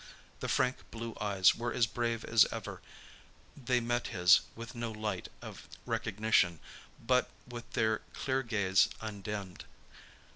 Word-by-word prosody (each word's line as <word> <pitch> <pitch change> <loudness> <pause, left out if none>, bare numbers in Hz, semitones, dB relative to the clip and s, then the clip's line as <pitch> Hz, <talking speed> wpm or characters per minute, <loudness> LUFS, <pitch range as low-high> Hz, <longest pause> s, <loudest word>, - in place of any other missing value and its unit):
The - - -3
frank 130 0 +2
blue 115 0 -6
eyes 100 -2 +4
were 120 +1 -3
as 115 - +3
brave 115 +1 -2
as 115 -2 +6
ever; - - -6 0.7
they 125 -2 +1
met 120 0 -1
his 90 -3 +6 0.2
with 115 +1 -8
no 120 -2 -4
light 105 -4 -3 0.2
of - - -9 0.2
recognition, 110 -6 +1 0.4
but 125 +2 +2 0.2
with 120 -1 -8
their 110 -1 +2
clear 130 0 -1
gaze 100 -6 +3
undimmed. 100 -3 -6
115 Hz, 135 wpm, -32 LUFS, 105-120 Hz, 0.7 s, as